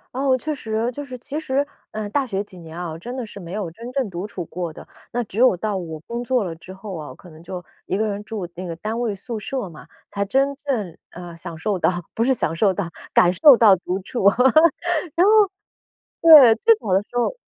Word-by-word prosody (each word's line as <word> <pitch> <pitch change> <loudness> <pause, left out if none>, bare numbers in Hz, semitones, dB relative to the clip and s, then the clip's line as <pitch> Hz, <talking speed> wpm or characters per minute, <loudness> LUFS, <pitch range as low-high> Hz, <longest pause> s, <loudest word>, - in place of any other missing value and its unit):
哦， 265 -1 +2
确 305 +3 -3
实， 225 -1 -2
就 290 - -6
是 255 -2 -8
其 290 +5 -6
实， 285 -2 -1 0.2
呃， 215 -1 -4
大 275 +4 0
学 200 -4 -2
几 195 -3 -11
年 165 0 -10
啊， 175 -2 -4
我 160 - -6
真 245 +9 -7
的 245 - -3
是 210 - -12
没 175 -3 -9
有 200 -4 -3
真 235 +7 -9
正 260 -5 -1
独 180 +2 -5
处 180 -5 -6
过 175 -1 -5
的。 - - -12 0.2
那 245 0 -1
只 210 +2 -6
有 250 -8 +5
到 210 +1 -2
我 165 -4 -5
工 235 +1 -4
作 245 -4 +1
了 165 -2 -5
之 185 +3 -12
后 190 0 -8
啊， 150 -2 -8
可 180 - -16
能 160 +2 -15
就 180 0 -6 0.2
一 190 - -1
个 220 0 0
人 205 0 -4
住 210 -5 -5
那 185 +1 -6
个 170 - -4
单 220 +5 -4
位 235 -4 -1
宿 220 +4 -6
舍 240 0 -4
嘛， 165 - -12 0.2
才 200 0 -2
真 275 +6 +1
正， 215 - -2
呃， 175 -1 -10
享 165 -1 -8
受 200 +3 -1
到， 180 - +2 0.2
不 230 - 0
是 265 +2 +3
享 165 -9 -1
受 195 +1 +3
到， 180 -3 -3 0.2
感 175 - +5
受 265 - +7
到 210 -4 +7
独 180 +2 -3
处。 240 - -4 0.9
然 360 +4 +4
后， - - +6 0.9
对， 290 -9 +9
最 455 - +5
早 195 - -3
的 195 - +4
时 245 +3 -8
候 245 - 0
210 Hz, 255 characters per minute, -22 LUFS, 180-250 Hz, 0.9 s, 对